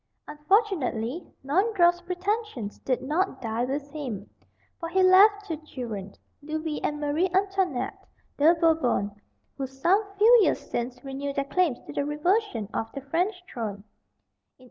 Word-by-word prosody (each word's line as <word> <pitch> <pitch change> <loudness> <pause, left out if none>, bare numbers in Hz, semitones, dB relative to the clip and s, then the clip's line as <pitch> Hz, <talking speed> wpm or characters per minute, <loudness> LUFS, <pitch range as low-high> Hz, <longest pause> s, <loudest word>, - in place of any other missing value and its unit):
Unfortunately 300 - 0
Naundorff's 350 +2 +3
pretensions 360 - -3
did 255 -2 -1
not 305 +2 0
die 230 0 -1
with 280 +2 -4
him, 245 -10 -5 0.5
for 330 - -4
he 375 +2 +3
left 405 +3 +6
two 325 -5 -3
children, 230 -10 -7 0.3
Louis 310 +1 -3
and 295 0 -1
Marie 300 +5 +1
Antoinette 385 -3 -1 0.3
"de 315 +4 +5
Bourbon," 315 -11 +2 0.5
who 270 -1 -3
some 340 +11 +2
few 460 +4 +7
years - - +3
since 245 +1 -3
renewed 275 +1 -4
their 275 - 0
claims 315 -3 +1
to - - -9
the 285 - 0
reversion 300 - 0
of 225 - -3
the 275 - -5
French 360 +7 -1
throne. 205 -4 -5
300 Hz, 140 wpm, -26 LUFS, 260-370 Hz, 0.5 s, few